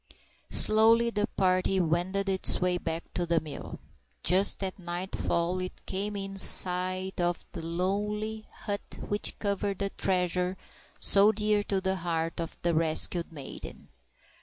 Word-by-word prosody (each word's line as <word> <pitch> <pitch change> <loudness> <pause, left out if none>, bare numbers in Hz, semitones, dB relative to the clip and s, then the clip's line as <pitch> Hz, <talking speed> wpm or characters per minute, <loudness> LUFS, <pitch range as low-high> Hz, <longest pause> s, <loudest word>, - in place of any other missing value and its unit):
_ - - -20 0.4
SLOWLY 225 +2 +5
the 210 -1 -1
party 185 -1 +1
wended 180 +4 0
its 190 -1 +3
way 180 -1 0
back 165 -1 -5
to 175 -1 -2
the 165 -1 +2
mill. 155 -2 -8 0.4
Just 190 +3 +3
at 190 +1 -4
nightfall 175 0 -2
it 185 0 -6
came 205 +2 -3
in 195 -1 -4
sight 185 0 +2
of 175 0 -1
the 165 - -7
lowly 210 +5 -3
hut 205 -1 -6
which 205 0 -1
covered 200 -1 -2
the 200 0 -2
treasure 180 0 -1 0.4
so 200 +2 +6
dear 210 -1 +1
to 200 -1 -1
the 190 0 -1
heart 165 -1 -2
of 165 - -6
the 170 0 +2
rescued 165 +2 +3
maiden. 145 -4 -10
185 Hz, 145 wpm, -28 LUFS, 175-200 Hz, 0.4 s, so